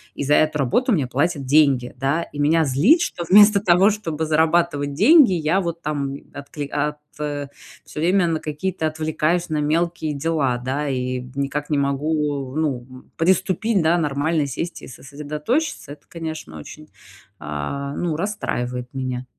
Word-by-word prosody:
И - - -3
за 145 - +2
эту 155 0 +3
работу 190 - +1
мне 150 -10 +1
платят 145 +3 -1
деньги, 135 -3 +3
да? 145 +5 0
И 145 - -10
меня 160 +2 +3
злит, 160 - +4
что 175 - -3
вместо 205 +1 +7
того, 185 +1 +5
чтобы 165 -7 -3
зарабатывать 160 -2 +1
деньги, 245 - +6
я 170 +3 +1
вот 170 -1 -4
там, 140 -2 -3 0.2
откли 145 0 -7
ат 150 +1 -2 0.2
всё 145 0 -7
время 180 +3 +3
на 165 -1 -1
какие-то 155 +2 -3
отвлекаюсь 160 +2 -1
на 155 - -1
мелкие 160 +1 -1
дела, 140 -4 0
да, 130 +4 -3
и, 125 -1 -2
м, 125 0 -10
никак 140 +1 -3
не 150 - +1
могу, 140 -1 -1
ну, 135 -6 -2
м, 130 0 -15
приступить, 190 +3 +1
да, 165 +2 +3
нормально 150 0 0
сесть 165 +6 -5
и - - -10
сосредоточиться. 150 - -4
Это, 145 - -11
конечно, 160 - -7
очень, 150 - -11 0.5
а, 80 - -5
ну, 170 -3 -2
расстраивает 125 -10 -3
меня. 130 -1 -4
150 Hz, 160 wpm, -21 LUFS, 140-170 Hz, 0.5 s, вместо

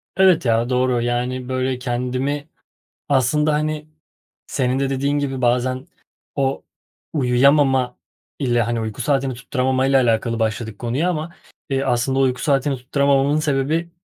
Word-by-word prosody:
Evet 185 -6 +4
ya, 115 +1 +2
doğru, 125 -1 +1
yani, 125 +1 -2
böyle, 130 0 -1
kendimi 130 +4 -2 0.6
aslında, 145 +3 +2
hani, 155 0 -2 0.6
senin 130 -1 0
de 135 0 0
dediğin 140 +2 0
gibi 135 -2 -3
bazen 125 +2 +1 0.5
o 135 -1 -1 0.5
uyuyamama 130 -1 +3 0.4
ile, 120 -4 +1
hani, 115 0 -1
uyku 110 +2 -5
saatini 135 -1 0
tutturamamayla 130 +1 +1
alakalı 115 0 +1
başladık 110 0 -2
konuya 130 +9 0
ama, 160 0 -3 0.4
iii, 135 0 0
aslında 130 +2 +1
uyku 130 -2 +1
saatini 140 -2 +1
tutturamamamın 140 +2 +2
sebebi, 155 +3 0
130 Hz, 130 wpm, -21 LUFS, 125-140 Hz, 0.6 s, Evet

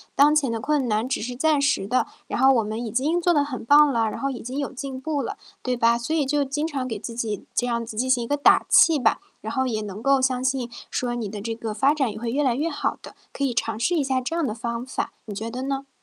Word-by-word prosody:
当 290 +2 +6
前 295 -5 +2
的 230 -1 -2
困 285 -1 +1
难 220 +3 0
只 - - -1
是 245 +2 -4
暂 295 +2 +2
时 280 -8 +1
的， 250 +6 +1 0.2
然 - - -3
后 265 +1 +6
我 230 - +2
们 215 +2 -4
已 225 - -4
经 290 +9 +1
做 350 0 +3
得 290 -2 +3
很 255 -5 -6
棒 290 +2 +6
了， 230 -3 +1
然 - - -6
后 275 - -1
已 260 - -5
经 255 +4 -6
有 285 -1 -2
进 265 0 -6
步 295 0 -1
了。 410 - -4 0.3
对 255 -1 -1
吧？ 235 0 +3
所 240 +7 -2
以 300 - +2
就 285 +1 +1
经 295 +3 -2
常 275 -5 -3
给 225 - -3
自 230 +3 -7
己 225 -3 -3
这 245 - 0
样 235 -1 -1
子 220 -1 -9
进 255 +3 0
行 250 -2 +3
一 235 - -6
个 290 - 0
打 285 - +5
气 320 -3 +6
吧， 225 - +2 0.2
然 220 - -5
后 260 +2 0
也 220 -4 -1
能 210 +2 -7
够 275 -1 +4
相 255 -1 +1
信 260 -2 0 0.2
说 240 -1 -1
你 225 -4 -3
的 205 0 -6
这 225 +2 -3
个 225 -2 -4
发 265 +7 +3
展 270 -7 0
也 215 - -8
会 235 0 -3
越 290 +3 +1
来 255 - +2
越 300 +7 -1
好 290 - -2
的， - - -12 0.2
可 280 - -3
以 270 - +1
尝 225 -2 -2
试 335 +10 +1
一 300 - +2
下 265 -1 0
这 300 +7 -3
样 335 -3 +1
的 215 - -2
方 235 +1 -4
法， 260 - -4
你 210 - -6
觉 220 +3 -4
得 250 +3 -5
呢？ 275 0 -3
255 Hz, 320 characters per minute, -24 LUFS, 230-280 Hz, 0.3 s, 当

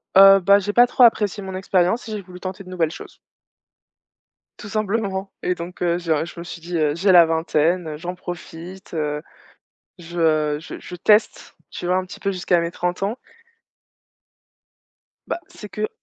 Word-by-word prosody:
Heu, 195 0 +9
bah, 200 +2 +5
j'ai 205 +1 -3
pas 245 +1 +6
trop 250 0 +3
apprécié 210 -3 +3
mon 190 -1 -6
expérience 190 +4 +1
et - - -6
j'ai 210 - -4
voulu 180 -1 -12
tenter 185 +1 -6
de 185 - -13
nouvelles 170 -4 0
choses - - -11 1.4
tout 205 - -9
simplement 205 -2 -2
et 180 - +1
donc 175 +1 -9
heu, 175 0 +1
je, 170 -2 -3
heu, 155 +1 +2
je 170 - -10
me - - -6
suis 170 -1 -9
dit, 175 0 -4
heu: 150 -1 +1
«J'ai 190 +3 +3
la 170 -2 +8
vingtaine, 160 0 0
j'en 175 +3 -5
profite, 175 +1 -9
heu, 150 -1 -2 0.8
je 160 -3 0
je 160 - -9
je 180 - -10
teste, 210 +5 +2
tu 175 - -6
vois? 180 +1 +2
Un 185 - 0
petit - - -11
peu 200 - 0
jusqu'à 180 -1 +1
mes 170 0 -2
30 180 +2 -3
ans». 215 +6 -1 2.1
Bah, 345 - -2
c'est 210 - -10
que 215 +1 -3
180 Hz, 185 wpm, -22 LUFS, 170-195 Hz, 2.1 s, Heu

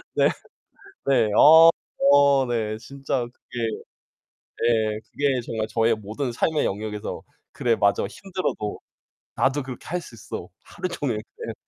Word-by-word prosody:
네. - - +5 0.8
네 120 -6 +3
어 160 +2 +9 0.3
저 140 -1 +5
네 110 -2 -1
진짜 135 0 -3
그게 120 0 -10 1.1
예 110 -2 +1
그게 140 -3 0
정말 110 -2 -3
저의 115 0 +2
모든 110 +5 -4
삶의 155 +5 +1
영역에서 105 +1 -4 0.3
'그래 115 -2 +1
맞아. 100 0 +2
힘들어도 180 - -4 0.6
나도 135 +2 +1
그렇게 130 -2 -9
할 175 +2 -2
수 120 - -12
있어. 105 - -7 0.2
하루종일.' 145 -11 -3
네. 110 - -8
120 Hz, 235 characters per minute, -24 LUFS, 110-140 Hz, 1.1 s, 어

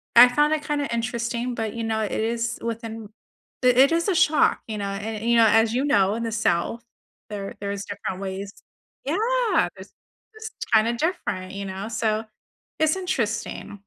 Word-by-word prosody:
I 245 +1 +10
found 295 +4 +3
it 305 - -1
kinda 290 -1 -1
interesting, 235 +1 -2
but 220 -2 -3
you 230 -1 -4
know, 220 -1 -1
it 210 - -2
is 230 +1 -1
within 225 -2 -5 0.5
it 255 +3 +5
is 335 +3 +1
a 380 - +2
shock, 310 -1 +3
you 215 -1 -4
know, 200 - -3
an 215 +3 -4
and, 220 - -6
you 235 - +4
know, 225 - +7
as 225 +1 +4
you 260 +3 +1
know, 200 -8 +3
in 230 - -3
the 225 - -2
South, 220 +1 0 0.5
there 200 -2 -6
there's 200 0 -4
different 200 -1 -5
ways 195 +1 -5 0.5
Yeah, 455 - +1
there's - - -12 0.4
it's 440 0 -7 0.2
kind 220 +1 +5
of 235 - -1
different, 200 - -2
you 200 0 -5
know, 190 +2 -5
so 220 -1 0 0.6
it's 315 +2 +3
interesting. 230 - -3
230 Hz, 180 wpm, -24 LUFS, 205-255 Hz, 0.6 s, I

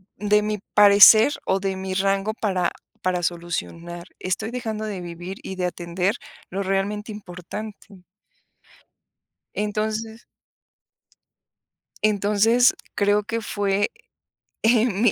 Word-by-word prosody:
de 210 +1 +2
mi 210 0 -2
parecer, 210 +5 +8
o 190 - +1
de 195 0 -2
mi 190 0 -4
rango 195 +2 0
para 185 -6 0 0.3
para 180 -1 0
solucionar, 170 0 -4
estoy 215 +5 -3
dejando 220 -3 -4
de 200 -4 -5
vivir 175 +2 -7
y 190 - -6
de 185 -1 -2
atender 180 +2 -1 0.3
lo 195 +2 -3
realmente 200 +3 -2
importante 205 +1 -9 1.5
entonces 215 +2 -3 1.8
entonces 215 +4 +3 0.2
creo 205 0 +2
que 230 +2 -3
fue, 205 -1 0 0.7
eh, 225 0 +4
mi, 220 -1 +2
205 Hz, 105 wpm, -23 LUFS, 185-215 Hz, 1.8 s, parecer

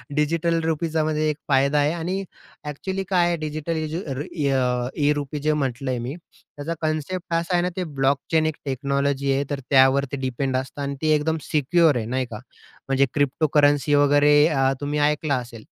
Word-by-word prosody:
Digital 165 +2 +1
रुपीचा, 160 0 0
म्हणजे 155 0 0
एक 150 - -1
फायदा 140 +1 +3
आहे 145 +2 +2
आणि 180 +4 -3 0.4
ॲक्चुअली 190 +7 -4
काय 180 -2 +3
आहे 175 - +1
डिजिटल 155 +1 -4
इजी 155 +1 -3 0.4
ई 145 -3 0 0.6
ई-रुपी 145 0 -1
जे 150 +1 +1
म्हटलं 135 -2 -2
आहे 125 - -2
मी, 125 +5 -5 0.4
त्याचा 155 +4 -3
कन्सेप्ट 160 +3 -3
असा 170 +2 0
आहे 175 - +3
ना, 180 - 0
ते 185 - -2
ब्लॉकचेन 140 +2 0
एक 155 -1 -1
टेक्नॉलॉजी 140 +1 -1
आहे, 140 +1 +1
तर 145 -1 -2
त्यावरती 135 0 +4
डिपेंड 130 0 -2
असतं 130 +2 -5
आणि 140 0 -3
ती 155 - +1
एकदम 160 +2 0
सिक्युअर 155 +1 +3
आहे 110 - -3
नही 130 +2 -1
का? 110 -3 -8 0.5
म्हणजे 135 0 +3
क्रिप्टोकरन्सी 145 0 +2
वगैरे 145 +1 +4
अ, 135 -4 +2
तुम्ही 145 +1 -1
ऐकलं 150 -1 -1
असेल. 120 -3 -7
145 Hz, 175 wpm, -23 LUFS, 140-160 Hz, 0.6 s, त्यावरती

